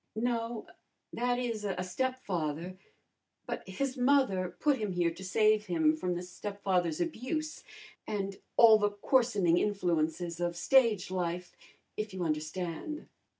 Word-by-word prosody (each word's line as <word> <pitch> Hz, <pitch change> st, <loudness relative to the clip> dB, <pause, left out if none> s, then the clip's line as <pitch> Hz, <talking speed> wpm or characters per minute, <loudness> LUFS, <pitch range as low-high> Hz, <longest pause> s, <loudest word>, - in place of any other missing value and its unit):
"No 230 Hz, -1 st, -1 dB, 0.5 s
that 245 Hz, +1 st, 0 dB
is, 230 Hz, -4 st, -2 dB
a 190 Hz, -3 st, -2 dB
stepfather. 185 Hz, -, -2 dB, 0.7 s
But -, -, -5 dB
his 265 Hz, +7 st, -2 dB
mother 245 Hz, -9 st, +2 dB
put 290 Hz, -4 st, +2 dB
him 210 Hz, -3 st, -2 dB
here 175 Hz, -1 st, +1 dB
to 190 Hz, -, -10 dB
save 215 Hz, +2 st, +3 dB
him 160 Hz, -3 st, +3 dB
from 180 Hz, +3 st, -2 dB
the 175 Hz, -, -4 dB
stepfather's 180 Hz, -2 st, -2 dB
abuse, 310 Hz, +1 st, -3 dB, 0.4 s
and 210 Hz, -, -1 dB, 0.2 s
and -, -, -17 dB, 0.2 s
all 220 Hz, -2 st, +8 dB
the 205 Hz, 0 st, +2 dB
coarsening 205 Hz, -5 st, +2 dB
influences 175 Hz, -3 st, 0 dB
of 175 Hz, 0 st, -1 dB
stage 230 Hz, -4 st, +3 dB
life, 180 Hz, -1 st, -3 dB, 0.4 s
if 215 Hz, -2 st, -4 dB
you 185 Hz, -, -2 dB
understand." 165 Hz, -, -3 dB
195 Hz, 135 wpm, -31 LUFS, 175-235 Hz, 0.7 s, all